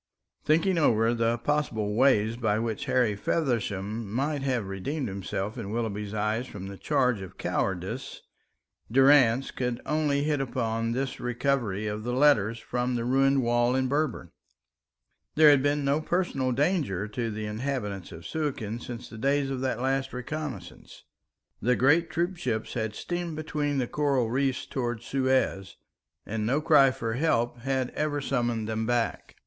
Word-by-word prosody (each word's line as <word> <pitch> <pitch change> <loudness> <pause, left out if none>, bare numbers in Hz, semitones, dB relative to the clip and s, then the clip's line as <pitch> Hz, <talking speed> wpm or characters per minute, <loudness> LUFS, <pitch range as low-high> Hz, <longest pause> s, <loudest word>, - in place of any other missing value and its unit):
Thinking 165 +3 +2
over 115 -5 +3
the 115 0 +1
possible 115 -5 -1
way 115 -2 +3
by 110 -3 0
which 115 -1 -2
Harry 120 -5 +2
Feversham 105 - -2
might 140 +5 -1
have 130 -6 0
redeemed 125 +9 -3
himself 100 +3 -4
in 100 -4 -5
Willoughby's 105 -2 -3
eyes 110 +4 -1
from 95 -2 -8
the 100 0 -7
charge 125 -8 +1
of 95 - -10
cowardice, 95 +7 -3 0.7
Durrance 135 -1 +5
could 125 -2 -2
only 150 -2 +1
hit 150 -2 0
upon 115 -3 -1
this 135 +2 -3
recovery 120 -4 -1
of 105 0 -3
the 120 +1 -2
letters 125 -5 +4
from 125 +1 -2
the 115 -1 -2
ruined 135 +1 +3
wall 120 +1 +2
in 130 0 +1
Berber. 140 - -1 1.0
There 150 -1 +8
had 140 -2 +5
been 145 +1 +1
no 140 +3 +2
personal 155 -7 0
danger 130 - 0
to 115 +2 -2
the 110 0 -4
inhabitants 105 -4 -3
of 85 0 -10
Suakin 130 -8 -3
since 120 0 -7
the 110 - -10
days 140 +2 +1
of 130 -1 -3
that 130 -3 -1
last 135 0 0
reconnaissance. 145 +3 -7 0.6
The 125 +4 +3
great 160 +7 +3
troop 175 +3 -1
ships 115 -7 -2
had 110 -3 -2
steamed 175 +2 -4
between 150 -2 -2
the 130 - +1
coral 135 -4 0
reefs 135 0 0
towards 120 -3 -3
Suez, 130 -8 0 0.5
and 110 0 -3
no 130 +7 +1
cry 150 -3 +6
for 115 -4 -3
help 120 -4 +1
had 130 0 -1
ever 150 -1 -1
summoned 120 -5 -1
them 110 0 -2
back. 120 -1 -1
125 Hz, 155 wpm, -27 LUFS, 110-140 Hz, 1.0 s, There